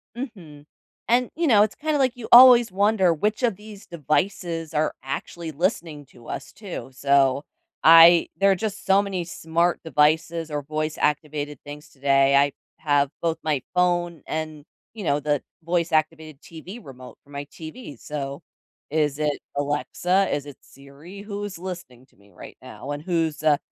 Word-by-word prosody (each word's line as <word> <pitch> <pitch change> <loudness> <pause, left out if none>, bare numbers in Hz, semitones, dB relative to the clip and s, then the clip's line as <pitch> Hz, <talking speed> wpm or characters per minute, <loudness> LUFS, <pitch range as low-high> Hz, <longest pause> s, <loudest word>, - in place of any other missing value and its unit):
Mhm, 180 - -9 0.4
and, 245 +1 +2
you 335 +1 0
know, 210 -6 +6
it's 215 - -2
kinda 310 0 -1
like 260 -3 +1
you 245 -3 -8
always 240 -2 +9
wonder 195 -2 +2
which 210 - -2
of 230 -5 +2
these 210 0 -13
devices 170 +1 -2
are 155 0 0
actually 160 +4 -6
listening 160 -2 -2
to 120 -2 -18
us, - - -6
too, 195 -8 -8
so, 140 0 +2 0.4
I 165 +1 +8
there 195 0 +3
are - - +3
just 215 +1 -5
so 195 +1 +4
many 195 -3 -3
smart 170 +1 -1
devices 160 +1 +1
or 145 0 -2
voice 155 +2 -4
activated 150 -1 -2
things 145 +1 -10
today, 135 0 +2
I 140 +1 +4 0.3
have 145 -2 +1
both 165 -1 -1
my 150 -4 0
phone 175 -2 0
and, 155 -2 -5 0.3
you 220 -2 -8
know, 145 -2 +1
the 145 -1 0 0.2
voice 170 +1 -1
activated 155 -2 -1
TV 175 +7 -10
remote 130 - -13
for - - -26
my 140 0 -6
TV, 160 - -10
so, 140 +2 -6 0.5
is 150 -1 0
it 150 -1 -1 0.2
Alexa, 150 +6 0
is 145 - -3
it 145 -2 -11
Siri, 140 +8 -14
who's 205 -2 -6
listening 175 -9 -8
to - - -32
me 100 +1 -23
right - - -13
now, 140 - -9
and 145 +1 -5
who's, 165 -3 -1
uh, 150 -2 +4
160 Hz, 165 wpm, -23 LUFS, 145-190 Hz, 0.5 s, always